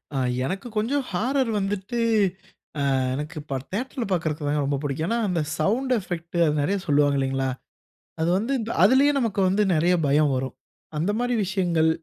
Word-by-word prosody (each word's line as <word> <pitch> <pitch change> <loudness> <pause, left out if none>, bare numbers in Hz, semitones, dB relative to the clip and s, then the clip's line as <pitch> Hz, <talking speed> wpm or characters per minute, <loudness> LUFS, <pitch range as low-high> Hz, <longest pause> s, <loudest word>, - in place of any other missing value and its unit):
ஆ - - 0 0.3
எனக்கு 195 - -4
கொஞ்சம் 265 +7 +1
ஹாரர் 250 +7 0
வந்துட்டு, 200 +4 -2 1.0
அ - - +2 0.2
எனக்கு 150 +5 -5
இப்ப 140 -2 -4
தியேட்டர் 255 +7 -4
ல - - 0
பாக்றதுக்கு 155 -4 -1
வேணா 145 0 +1
ரொம்ப 140 0 0
புடிக்கும். 145 +3 -2
ஏன்னா 230 - 0
அந்த 175 -4 0 0.2
சவுண்ட் 250 +10 +1
எபெக்ட், 175 -2 -5
அது 150 - +2
நிறைய 195 +8 +1
சொல்லுவாங்க 145 -1 +3
இல்லேங்களா! 135 0 0 0.7
அது 165 - +2
வந்து 230 +7 -1
இந்த 225 +1 -3
அதிலயே 265 +8 +5
நமக்கு 225 -6 -1
வந்து 195 +3 +2
நிறைய 170 +3 +3
பயம் 145 +1 +3
வரும். 130 0 -3 0.4
அந்தமாரி 220 +9 0
விஷயங்கள். 175 -4 +1
180 Hz, 165 wpm, -24 LUFS, 150-225 Hz, 1.0 s, அதிலயே